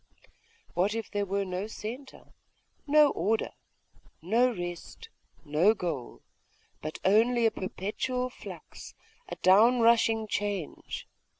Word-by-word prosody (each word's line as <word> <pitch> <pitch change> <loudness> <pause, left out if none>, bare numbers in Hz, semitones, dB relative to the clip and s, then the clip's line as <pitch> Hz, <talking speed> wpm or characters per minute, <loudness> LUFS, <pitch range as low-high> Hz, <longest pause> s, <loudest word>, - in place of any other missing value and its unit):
What 195 +5 +1
if 225 -1 -5
there 205 -1 -1
were 200 +1 -1
no 185 +2 -3
centre, 240 +5 -9 0.5
no 300 0 +6
order, 220 +2 0 0.7
no 230 +9 +2
rest, 175 - -7 0.4
no 165 +9 +3
goal 160 - -5 0.6
but 155 +1 -5
only 230 +4 +4
a 225 - +4
perpetual 250 +7 -3
flux, - - -11 0.3
a - - -5
down 225 +6 +5
rushing 230 -1 +4
change? 205 -6 -4
215 Hz, 110 wpm, -29 LUFS, 185-235 Hz, 0.7 s, no